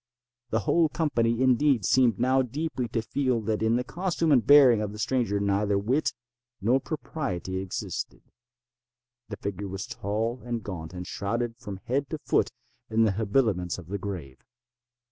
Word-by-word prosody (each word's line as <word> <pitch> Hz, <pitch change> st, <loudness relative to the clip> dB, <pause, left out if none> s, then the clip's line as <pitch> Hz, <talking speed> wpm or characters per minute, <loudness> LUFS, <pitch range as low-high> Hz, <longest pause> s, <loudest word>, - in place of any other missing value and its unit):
The 110 Hz, 0 st, +1 dB
whole 160 Hz, -, +3 dB
company, 120 Hz, -7 st, +1 dB
indeed, 130 Hz, -3 st, +3 dB
seemed 120 Hz, -3 st, +4 dB
now 130 Hz, +2 st, +3 dB
deeply 130 Hz, 0 st, -3 dB
to 115 Hz, -1 st, -2 dB
feel 130 Hz, 0 st, 0 dB
that 110 Hz, 0 st, -1 dB
in 110 Hz, +1 st, +3 dB
the 125 Hz, -, +1 dB
costume 170 Hz, +1 st, -1 dB
and 125 Hz, -5 st, +5 dB
bearing 130 Hz, -4 st, +7 dB
of 105 Hz, -1 st, -3 dB
the -, -, -8 dB
stranger 115 Hz, -3 st, 0 dB
neither 100 Hz, 0 st, +1 dB
wit 125 Hz, +10 st, +1 dB, 0.5 s
nor 120 Hz, +7 st, +3 dB
propriety 125 Hz, -, -4 dB
existed. 95 Hz, -1 st, -5 dB, 1.1 s
The 105 Hz, -, -5 dB
figure 100 Hz, 0 st, -4 dB
was 95 Hz, 0 st, -5 dB
tall 115 Hz, +3 st, -3 dB
and 120 Hz, -2 st, -3 dB
gaunt, 90 Hz, -3 st, -6 dB
and 90 Hz, 0 st, -5 dB
shrouded 115 Hz, +5 st, -2 dB
from 100 Hz, -5 st, -7 dB
head 135 Hz, +2 st, -1 dB
to 155 Hz, -, -3 dB
foot -, -, +1 dB, 0.4 s
in 110 Hz, +1 st, +3 dB
the 110 Hz, -, +3 dB
habiliments 100 Hz, -3 st, +1 dB
of 90 Hz, -3 st, -11 dB
the 100 Hz, +1 st, -3 dB
grave. 85 Hz, -10 st, -6 dB
115 Hz, 165 wpm, -27 LUFS, 100-130 Hz, 1.1 s, bearing